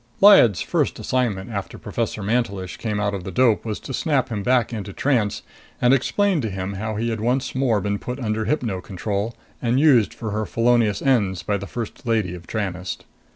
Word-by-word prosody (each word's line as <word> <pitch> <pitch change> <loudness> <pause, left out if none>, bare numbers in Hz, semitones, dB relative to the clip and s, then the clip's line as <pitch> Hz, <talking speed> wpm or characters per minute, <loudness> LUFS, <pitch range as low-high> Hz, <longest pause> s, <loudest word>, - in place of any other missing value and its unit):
Lyad's 195 - +7
first - - 0
assignment 120 -5 -1
after 100 -3 -5
Professor 105 - -3
Mantelish 100 -4 -1
came 105 -3 -2
out 105 0 0
of 95 -3 -4
the 95 - -5
dope 115 +2 +3
was 110 -2 -4
to 135 - -7
snap 135 -3 +1
him 105 -3 -3
back 125 +1 +2
into 105 -3 -5
trance 115 -7 0 0.4
and 125 +1 +4
explain 185 +6 +2
to 110 - -2
him 95 0 -4
how 110 +2 -3
he 115 +2 -1
had 110 -1 -3
once 125 +3 0
more 130 -5 +2
been 100 +1 -2
put 125 +2 -5
under 110 -3 -1
hypno 115 -10 -1
control 100 +4 -3 0.3
and 120 +1 +2
used 135 -8 +5
for 110 -3 -5
her 110 +1 -2
felonious 115 -3 +2
ends 105 -9 +2
by 105 - 0
the 100 0 -4
First 115 +1 -6
Lady 110 -6 +1
of 85 -1 -10
Tranest. 95 -4 -4
110 Hz, 200 wpm, -22 LUFS, 100-125 Hz, 0.4 s, Lyad's